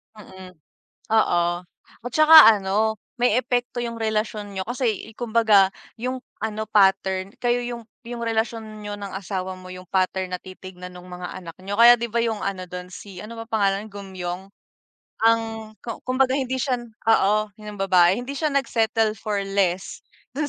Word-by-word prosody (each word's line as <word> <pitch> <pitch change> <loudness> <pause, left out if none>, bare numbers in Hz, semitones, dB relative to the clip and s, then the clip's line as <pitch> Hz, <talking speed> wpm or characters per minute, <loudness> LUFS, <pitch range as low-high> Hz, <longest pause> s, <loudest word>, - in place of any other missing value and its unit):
Mm. 190 -3 -12 0.6
Oo, 220 -5 +3 0.6
at 245 - -4
tsaka 310 -4 +9
ano, 210 +1 0 0.2
may 245 -1 +3
epekto 245 -1 -2
yung 235 -1 -4
relasyon 215 -2 -2
niyo, 190 - -4
kasi, 240 -4 -1
eh, 220 - -15
kumbaga 220 -5 +4 0.2
yung 255 +2 -3 0.2
ano, 220 -1 -3
pattern 195 -2 +2
kayo 245 0 +1
yung 235 -2 -6 0.2
yung 235 0 -6
relasyon 220 -1 -2
niyo 205 - -5
ng 200 -1 -6
asawa 190 -1 -4
mo, 185 0 -11
yung 185 -1 -11
pattern 185 0 0
na - - -18
titignan 185 -1 -10
nung 180 0 -12
mga 180 0 -7
anak 170 -3 -9
niyo. 200 +1 -3
Kaya 240 +1 +9
di 235 0 -3
ba, 235 - +2
yung 220 -2 -2
ano 195 -2 -3
dun, 180 0 -7
si 190 -1 -10
ano 230 +2 -9
ba - - -6
pangalan 200 -3 +1
nun, - - -22
Geum-myeong? 190 -3 -6 0.8
Ang 230 0 +4 0.4
ku 230 - -6
kumbaga 255 +1 +2
hindi 260 -2 -1
siya 250 -2 0 0.3
oo, 215 -1 +3
yun 210 -1 -9
yung - - -11
babae, 185 -1 +4
hindi 250 +3 -6
siya 310 +2 0
nag-settle 225 -5 +1
for 210 -1 -2
less 195 -2 -1 0.4
dun 295 0 -1
215 Hz, 175 wpm, -23 LUFS, 190-235 Hz, 0.8 s, tsaka